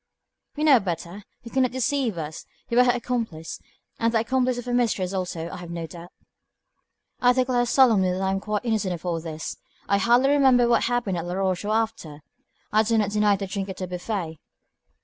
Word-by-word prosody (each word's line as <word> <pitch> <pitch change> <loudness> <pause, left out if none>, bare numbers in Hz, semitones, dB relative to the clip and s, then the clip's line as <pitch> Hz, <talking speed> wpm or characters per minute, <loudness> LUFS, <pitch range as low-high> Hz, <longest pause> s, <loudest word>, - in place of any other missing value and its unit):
"We 300 - -2
know 285 -5 +7
better. 180 +1 -5 0.2
You 230 - -10
cannot 260 -1 +2
deceive 260 -5 0
us. 155 -1 -6 0.2
You 235 - 0
were 250 - +7
her 245 - +5
accomplice, 230 -9 -3 0.4
and 230 0 +2
the 225 -1 +2
accomplice 255 +1 0
of 245 - -6
her 245 - -3
mistress, 210 -6 0
also, 180 -3 -3
I - - -7
have 175 -1 -9
no 170 -1 -4
doubt." 170 +2 -11 1.1
"I 245 0 +5
declare 250 -1 +1
solemnly 225 -8 +4
that 180 - -2
I 190 - +1
am 195 - 0
quite 210 +2 -3
innocent 210 -6 0
of 170 - -12
all 170 -2 -1
this. 160 -1 -6 0.3
I 200 0 +2
hardly 240 +6 +4
remember 265 -4 +5
what 235 - +3
happened 235 -7 -1
at 165 - -5
Laroche 185 +1 -1
or 215 - 0
after. 170 -10 -3 0.5
I 215 - +4
do 225 +1 +1
not 210 -2 +1
deny 210 -1 +3
the 195 0 -4
drink 195 0 -4
at 190 - -6
the 185 - -3
buffet. 180 -3 -4
210 Hz, 205 wpm, -24 LUFS, 180-245 Hz, 1.1 s, know